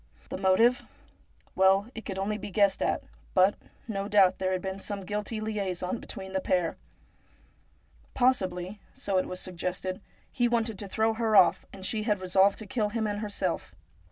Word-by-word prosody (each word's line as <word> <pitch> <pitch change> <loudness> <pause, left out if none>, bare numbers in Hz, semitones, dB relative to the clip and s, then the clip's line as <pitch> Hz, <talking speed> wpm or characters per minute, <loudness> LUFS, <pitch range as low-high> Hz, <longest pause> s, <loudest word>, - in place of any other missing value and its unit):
The - - -4
motive? 215 +6 +4 0.7
Well, 195 +4 +4
it 225 - -8
could 195 -3 -4
only 210 +2 -1
be 205 - -6
guessed 200 -1 +2
at; - - 0 0.3
but, 190 +2 +5 0.3
no 200 -3 -3
doubt, 195 -3 +4
there 185 0 0
had 185 - 0
been 190 0 -4
some 200 -1 -5
guilty 210 +2 -3
liaison 200 -2 -2
between 190 0 -8
the 190 - 0
pair. 180 -3 +1 1.4
Possibly 195 -6 +1
— - - -31
so 195 -2 0
it - - -2
was 185 - -4
suggested 185 +1 -4 0.2
— - - -35
he 240 -3 +2
wanted 230 -3 0
to 205 - -4
throw 220 +3 +1
her 220 -1 +1
off, - - +5
and 190 -1 -8
she 215 +2 -1
had 210 -2 0
re 185 - -6
solved 195 +2 +4
to 220 - -6
kill 210 +1 -1
him 220 +1 -1
and 205 -1 -2
herself. 195 - -3
200 Hz, 185 wpm, -28 LUFS, 185-215 Hz, 1.4 s, but